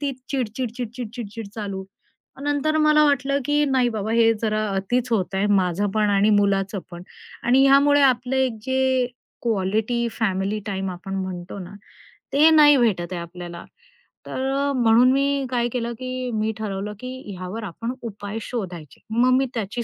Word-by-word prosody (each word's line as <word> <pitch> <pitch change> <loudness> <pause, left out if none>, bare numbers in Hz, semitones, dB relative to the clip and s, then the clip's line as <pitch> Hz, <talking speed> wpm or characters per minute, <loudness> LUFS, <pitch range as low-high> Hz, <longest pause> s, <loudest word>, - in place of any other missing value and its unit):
तिच 280 -3 -2
चिड-चिड, 250 -3 -2
चिड-चिड, 240 -1 -5
चिड-चिड 225 -2 -6
चालू. 200 -3 -4 0.5
मग 270 - -10
नंतर 290 +2 +1
मला 305 0 +5
वाटलं, 280 -1 +2
की 295 +2 +2
नाही 260 -3 +2
बाबा 220 -1 -3
हे 230 -1 +5
जरा 215 -1 0
अतिच 235 +6 -1
होतंय, 195 -1 0
माझं 195 0 +1
पण 210 -1 +2
आणि 200 +1 +3
मुलाचं 200 -1 +2
पण. 175 0 -9 0.4
आणि 255 +3 +4
ह्यामुळे 285 +1 +5
आपलं 255 0 +2
एक 260 -4 0
जे 260 -1 +1 0.4
क्वालिटी 220 +2 0
फॅमिली 195 -1 0
टाईम 195 -2 -2
आपण 185 +2 -7
म्हणतो 185 -1 -5
ना, 185 +1 -9 0.6
ते 305 +3 +6
नाही 295 -3 +7
भेटत 190 -7 +1
आहे 175 - -3
आपल्याला. 170 0 -8 0.6
तर 265 +1 -3
अ, 280 +1 +1
म्हणून 235 +2 +5
मी 275 0 +1
काय 240 -2 0
केलं, 235 -1 -2
की 255 0 -4
मी 220 0 0
ठरवलं, 210 -1 -4
की 255 -4 -7
ह्यावर 185 +5 -6
आपण 230 +6 -5
उपाय 210 -1 -6
शोधायचे. 180 - -6
मग 240 +3 +3
मी 270 - +2
त्याची 225 +2 -3
225 Hz, 165 wpm, -23 LUFS, 195-260 Hz, 0.6 s, नाही